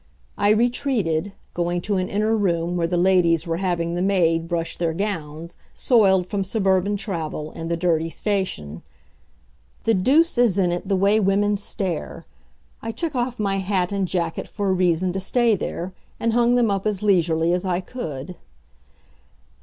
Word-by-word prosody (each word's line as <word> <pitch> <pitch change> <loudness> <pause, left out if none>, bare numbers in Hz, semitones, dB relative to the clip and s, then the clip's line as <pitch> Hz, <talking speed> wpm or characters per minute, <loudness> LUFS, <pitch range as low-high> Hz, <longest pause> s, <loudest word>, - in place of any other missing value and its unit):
I 205 - +2
retreated, 215 - +1 0.2
going 175 0 -1
to 200 +2 -1
an 185 0 -1
inner 215 +2 +1
room 175 -4 0
where 170 -1 0
the 175 +1 -1
ladies 175 -3 +3
were 165 -1 -2
having 170 -2 -1
the 175 - -1
maid 165 -4 +2
brush 170 -1 -2
their 165 -2 -1
gowns, 165 -4 -4 0.2
soiled 195 -7 +3
from 195 +1 -2
suburban 195 0 +1
travel 160 -7 -4
and 165 0 -6
the 170 - 0
dirty 165 -2 +1
station. 165 - -3 1.0
The 225 - +3
deuce 265 - +3
is 230 -6 +3
in 180 -3 +2
it 175 +2 -3
the 195 - +1
way 200 +3 +3
women 205 +1 +2
stare. 195 -4 -4 0.6
I 225 - -5
took 320 +7 -3
off 245 -1 -2
my 200 -2 0
hat 190 -1 0
and 195 -2 -1
jacket 170 -2 -2
for 205 -2 -2
a - - +3
reason 180 0 +1
to 190 - -2
stay 235 +4 +2
there, 180 0 -5 0.3
and 230 0 0
hung 240 +1 +3
them 235 -4 +3
up 195 +1 -1
as 210 -1 -2
leisurely 170 -4 +2
as 180 - 0
I 180 -2 0
could. 175 - -6
190 Hz, 170 wpm, -22 LUFS, 170-205 Hz, 1.0 s, ladies